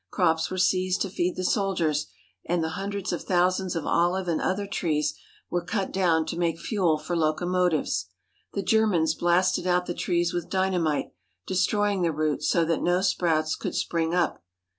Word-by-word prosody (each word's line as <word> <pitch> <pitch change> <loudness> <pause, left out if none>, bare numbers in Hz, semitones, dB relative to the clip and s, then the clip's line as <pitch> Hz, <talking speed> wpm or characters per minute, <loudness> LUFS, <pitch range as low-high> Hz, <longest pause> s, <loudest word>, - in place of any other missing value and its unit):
Crops 160 - +1
were 185 - -4
seized 185 0 +1
to 195 - -5
feed 180 -1 -1
the 185 - -3
soldiers, 175 -6 0 0.4
while 170 -2 0
hundreds 195 +1 -3
of 175 - -3
thousands 185 0 +1
of 165 - -3
olive 180 +2 +1
and 165 -2 0
other 200 +2 -1
trees 155 -6 -1 0.4
were 175 -1 0
cut 190 +2 -2
down 170 -4 +2
to 165 - -4
make 170 -2 0
fuel 180 -6 +1
for 155 +3 -4
locomotives. 165 - 0 0.5
The 200 - -2
Germans 185 -8 +2
blasted 175 +2 +1
out 180 0 +2
the 175 - -3
trees 175 -1 0
with 175 -1 -3
dynamite, 185 -5 0 0.3
destroying 205 +1 +1
the 170 -2 +2
roots 155 -1 -1
so 170 -1 +3
that 165 -1 0
no 175 +1 +2
sprouts 160 -5 +1
could - - -5
spring 165 -1 0
up. 175 - 0
175 Hz, 170 wpm, -26 LUFS, 160-185 Hz, 0.5 s, so